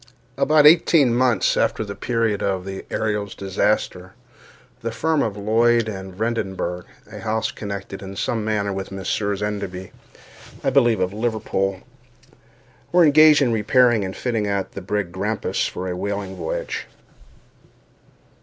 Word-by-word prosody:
About 150 Hz, +2 st, +4 dB
eighteen 150 Hz, -5 st, +6 dB
months 120 Hz, -5 st, +2 dB
after 110 Hz, -, 0 dB
the 100 Hz, -, -6 dB
period 115 Hz, -2 st, -1 dB
of 95 Hz, -2 st, -1 dB
the 95 Hz, 0 st, -6 dB
Ariel's 105 Hz, -2 st, -2 dB
disaster, 95 Hz, -1 st, -1 dB, 0.7 s
the 115 Hz, -, -3 dB
firm 155 Hz, +6 st, 0 dB
of 105 Hz, -2 st, -2 dB
Lloyd 115 Hz, +2 st, +2 dB
and 95 Hz, -3 st, -7 dB
Vredenburgh 95 Hz, -5 st, -3 dB, 0.3 s
(a -, -, -8 dB
house 110 Hz, 0 st, -1 dB
connected 100 Hz, -2 st, -6 dB
in 95 Hz, 0 st, -8 dB
some 110 Hz, +2 st, -1 dB
manner 105 Hz, -2 st, -1 dB
with 95 Hz, 0 st, -4 dB
the 95 Hz, -, -9 dB
Messieurs 100 Hz, +1 st, -2 dB
Enderby, 100 Hz, -3 st, -4 dB, 0.7 s
I 135 Hz, -, +1 dB
believe, 120 Hz, -4 st, +3 dB
of 90 Hz, +1 st, 0 dB
Liverpool) 105 Hz, -4 st, -2 dB, 1.1 s
were 175 Hz, -1 st, +6 dB
engaged 150 Hz, 0 st, +6 dB
in 120 Hz, -3 st, +1 dB
repairing 115 Hz, 0 st, +3 dB
and 95 Hz, 0 st, -5 dB
fitting 115 Hz, -4 st, -1 dB
out 100 Hz, -1 st, -2 dB
the 100 Hz, -, -7 dB
brig 100 Hz, -1 st, -2 dB
Grampus 100 Hz, +4 st, -1 dB
for 90 Hz, +1 st, -5 dB
a 90 Hz, -, -3 dB
whaling 100 Hz, 0 st, -4 dB
voyage. 85 Hz, -3 st, -4 dB
105 Hz, 145 wpm, -22 LUFS, 95-115 Hz, 1.1 s, eighteen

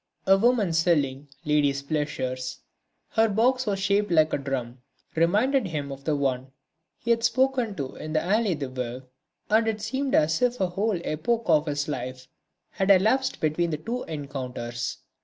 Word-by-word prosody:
A 195 Hz, -, +6 dB
woman 215 Hz, -4 st, +2 dB
selling 150 Hz, -5 st, +1 dB, 0.2 s
"ladies' 145 Hz, -2 st, +2 dB
pleasures," 140 Hz, -4 st, -3 dB, 0.5 s
her 225 Hz, 0 st, +3 dB
box 250 Hz, +4 st, +2 dB
was 200 Hz, -1 st, +1 dB
shaped 200 Hz, +2 st, +1 dB
like 155 Hz, -2 st, +3 dB
a -, -, +2 dB
drum 130 Hz, -3 st, -4 dB, 0.3 s
reminded 210 Hz, -, +2 dB
him 145 Hz, -4 st, -4 dB
of 135 Hz, 0 st, -9 dB
the 155 Hz, -, +1 dB
one 130 Hz, -2 st, -1 dB, 0.5 s
he 235 Hz, -, -2 dB
had 230 Hz, 0 st, +2 dB
spoken 250 Hz, -2 st, +1 dB
to 135 Hz, -5 st, -5 dB
in 155 Hz, -, -6 dB
the 155 Hz, -, +2 dB
Allée 195 Hz, 0 st, +1 dB
des 140 Hz, -2 st, -3 dB
Veuves, 125 Hz, 0 st, -5 dB, 0.5 s
and 225 Hz, +1 st, +4 dB
it 220 Hz, -1 st, -1 dB
seemed 265 Hz, +5 st, -1 dB
as 160 Hz, +7 st, +2 dB
if 250 Hz, 0 st, +1 dB
a 185 Hz, -, +1 dB
whole 200 Hz, +1 st, 0 dB
epoch 230 Hz, +10 st, -1 dB
of 155 Hz, -2 st, +3 dB
his 145 Hz, -1 st, -1 dB
life 130 Hz, -2 st, -5 dB, 0.4 s
had 195 Hz, -1 st, -1 dB
elapsed 220 Hz, +8 st, +3 dB
between 160 Hz, +2 st, 0 dB
the 155 Hz, -, -2 dB
two 235 Hz, +10 st, -4 dB
encounters. 125 Hz, -5 st, -5 dB
165 Hz, 170 wpm, -26 LUFS, 140-220 Hz, 0.5 s, A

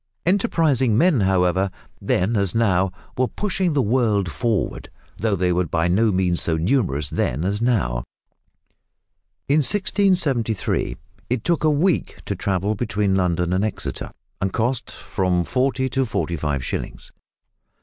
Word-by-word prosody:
Enterprising 160 Hz, -, +2 dB
men, 165 Hz, -1 st, +4 dB
however, 95 Hz, 0 st, +2 dB, 0.3 s
then 100 Hz, +6 st, +1 dB
as 100 Hz, -2 st, 0 dB
now, 95 Hz, -5 st, +2 dB, 0.2 s
were 130 Hz, 0 st, +1 dB
pushing 190 Hz, -2 st, -1 dB
the 140 Hz, -3 st, +2 dB
world 105 Hz, -5 st, +1 dB
forward, 110 Hz, -, -2 dB, 0.3 s
though 110 Hz, -2 st, +1 dB
they 90 Hz, -1 st, +1 dB
were 90 Hz, 0 st, 0 dB
by 80 Hz, +1 st, 0 dB
no 105 Hz, +5 st, +3 dB
means 90 Hz, -2 st, +1 dB
so 80 Hz, -1 st, +1 dB
numerous 80 Hz, -, 0 dB
then 70 Hz, +7 st, -1 dB
as 100 Hz, +3 st, -1 dB
now. 85 Hz, -, +1 dB, 1.4 s
In 145 Hz, -, +3 dB
1673 175 Hz, -, +1 dB, 0.3 s
it 125 Hz, -2 st, -1 dB
took 170 Hz, -2 st, +1 dB
a 155 Hz, -, +4 dB
week 155 Hz, +4 st, +1 dB
to -, -, -2 dB
travel 100 Hz, +2 st, -1 dB
between 105 Hz, -2 st, 0 dB
London 90 Hz, -2 st, +1 dB
and 95 Hz, +2 st, +1 dB
Exeter, 110 Hz, -, -4 dB, 0.3 s
and 95 Hz, 0 st, 0 dB
cost 120 Hz, +4 st, -1 dB
from 90 Hz, -2 st, -1 dB
forty 130 Hz, +5 st, 0 dB
to 135 Hz, +1 st, +1 dB
forty 85 Hz, -5 st, -2 dB
five 75 Hz, -4 st, -2 dB
shillings. -, -, -5 dB
105 Hz, 140 wpm, -22 LUFS, 90-130 Hz, 1.4 s, men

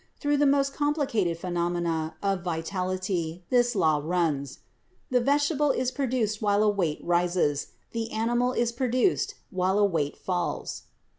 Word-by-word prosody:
Through 290 Hz, -1 st, +1 dB
the 290 Hz, 0 st, +4 dB
most 275 Hz, 0 st, +2 dB
complicated 270 Hz, -, 0 dB
phenomena 170 Hz, -2 st, -1 dB
of 195 Hz, -2 st, 0 dB
vitality 180 Hz, 0 st, -2 dB
this 245 Hz, -1 st, +3 dB
law 155 Hz, -6 st, +3 dB
runs: 155 Hz, -5 st, -1 dB, 0.5 s
the 250 Hz, -, +4 dB
vegetable 290 Hz, +2 st, +2 dB
is 255 Hz, -1 st, +1 dB
produced 245 Hz, -6 st, -1 dB
while 205 Hz, 0 st, +3 dB
a 215 Hz, -, +4 dB
weight 175 Hz, -7 st, 0 dB
rises, 175 Hz, -4 st, +1 dB, 0.2 s
the 230 Hz, -1 st, -3 dB
animal 240 Hz, +3 st, +1 dB
is 240 Hz, -2 st, 0 dB
produced 260 Hz, -, +1 dB, 0.2 s
while 185 Hz, 0 st, +1 dB
a 205 Hz, -, +5 dB
weight 160 Hz, -7 st, -1 dB
falls. 180 Hz, -2 st, -3 dB
200 Hz, 140 wpm, -27 LUFS, 175-250 Hz, 0.5 s, a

